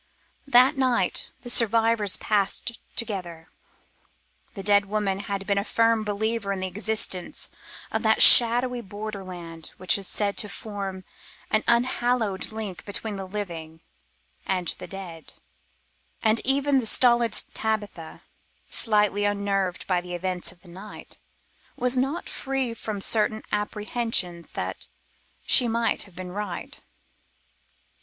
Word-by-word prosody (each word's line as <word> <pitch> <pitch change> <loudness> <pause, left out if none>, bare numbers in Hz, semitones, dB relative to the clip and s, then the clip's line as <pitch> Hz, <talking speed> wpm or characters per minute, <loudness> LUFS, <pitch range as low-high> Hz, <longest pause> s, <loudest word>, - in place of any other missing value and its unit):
That 255 0 +5
night 255 -3 +1
the 245 - -8
survivors 225 -3 +3
passed 210 +2 0 0.2
together. 180 -8 -5 1.1
The 195 - -6
dead 205 0 +4
woman 200 -2 -1
had 200 -1 -4
been 200 0 +1
a - - -2
firm 230 0 +2
believer 210 0 -2
in 195 - -2
the - - -2
existence 205 -2 -1 0.4
of - - -1
that - - +5
shadowy 245 +1 +8
borderland 185 -6 -8
which 185 +2 +3
is 195 - -4
said 205 -1 -1
to 210 - -1
form 195 -4 -6 0.5
an 215 - +2
unhallowed 235 -4 +1
link 215 -5 -6
between 205 +1 -4
the 195 -1 -6
living 170 -5 -6 0.6
and 180 -3 -1
the - - -8
dead, 175 -5 -9 0.9
and 220 +1 +3
even 275 +1 +2
the 235 - -2
stolid 240 -1 +4 0.2
Tabitha, 205 -7 -4 0.5
slightly 210 -2 +2
unnerved 200 -3 -1
by 180 -2 0
the 180 0 -7
events 180 0 -3
of 175 -1 -22
the 180 - -19
night, 190 +5 -11 0.6
was 250 +1 0
not 270 +6 -1
free 270 -3 -2
from 215 -3 -6
certain 215 +1 +1
apprehensions 210 -4 -2
that - - -5 0.6
she 245 - +6
might 230 -1 0
have 175 - -24
been 185 -1 -7
right. 200 -2 -6
205 Hz, 130 wpm, -25 LUFS, 190-230 Hz, 1.1 s, shadowy